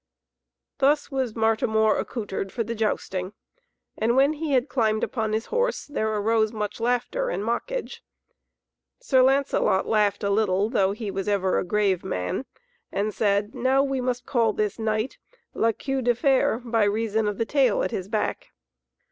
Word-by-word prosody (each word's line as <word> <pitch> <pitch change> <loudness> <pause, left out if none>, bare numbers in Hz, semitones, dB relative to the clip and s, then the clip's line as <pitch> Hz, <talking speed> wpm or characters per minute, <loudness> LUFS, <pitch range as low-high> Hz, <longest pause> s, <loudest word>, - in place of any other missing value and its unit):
Thus 290 +2 +2
was 260 -5 -2
Martimor 220 -1 +2
accoutred 195 -4 -4
for 235 - -2
the 230 +2 -4
jousting, 200 -3 -2 0.6
and 230 +2 +1
when 275 +3 +4
he 310 -1 -3
had 255 +1 +2
climbed 220 -4 0
upon 220 -3 -1
his 220 +1 -1
horse, 485 +1 -1
there 220 -7 -2
arose 220 +1 +1
much 210 -1 -4
laughter 245 - 0
and 205 - -2
mockage. - - -3 1.0
Sir 270 - +3
Lancelot 265 -7 +2
laughed 210 -2 +1
a 200 - +1
little, 205 0 +1
though 195 -5 +2
he 210 -1 -5
was 195 0 -4
ever 195 -2 +1
a - - -1
grave 195 -1 +1
man, 90 - -3 0.4
and 210 +2 -1
said, 205 +2 +1
"Now 260 +2 +2
must 255 -2 -2
we - - -42
call 230 -4 +2
this 210 +1 -2
knight, 220 +2 -1 0.3
La 230 - +2
Queue 270 +4 -3
de 245 -1 +2
Fer, 265 -3 +2
by 230 -2 +2
reason 215 +1 0
of 205 -1 -2
the 230 - 0
tail 265 -3 +2
at 185 - -2
his 185 - -4
back." 215 0 -2
220 Hz, 165 wpm, -25 LUFS, 210-255 Hz, 1.0 s, when